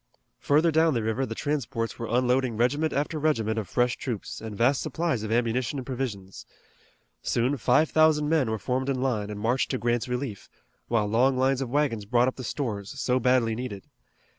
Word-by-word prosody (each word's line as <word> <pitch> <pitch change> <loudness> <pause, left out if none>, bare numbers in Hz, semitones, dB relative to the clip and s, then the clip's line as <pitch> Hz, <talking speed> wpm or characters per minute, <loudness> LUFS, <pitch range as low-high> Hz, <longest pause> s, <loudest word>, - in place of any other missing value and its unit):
Further 155 +4 +3
down 160 -1 +3
the 115 - 0
river 110 +5 -1
the 115 - -5
transports 120 -6 -2
were 115 - -3
unloading 125 -1 +1
regiment 145 +7 +1
after 150 +2 -1
regiment 115 -8 +1
of 100 -6 -6
fresh 120 0 +1
troops, 120 -7 -5
and 110 -2 -7
vast 125 +4 +3
supplies 165 -9 -1
of 110 0 -4
ammunition 120 +3 0
and 130 - -5
provisions. 115 -8 -5 0.8
Soon 125 +4 0
five 150 +4 +2
thousand 155 -1 +4
men 150 -6 +2
were 110 - -1
formed 130 +4 -2
in 135 -2 0
line 115 -6 -1
and 105 -1 -6
marched 120 +5 0
to 130 - -1
Grant's 120 0 -1
relief, 125 -4 -4 0.4
while 115 -3 +1
long 125 +5 +2
lines 135 +1 +2
of 130 - -3
wagons 125 -6 0
brought 120 +3 +3
up 130 - -2
the 130 - -6
stores 115 -2 -4
so 125 -1 +1
badly 125 -2 +2
needed. 110 -4 -6
125 Hz, 190 wpm, -26 LUFS, 115-135 Hz, 0.8 s, thousand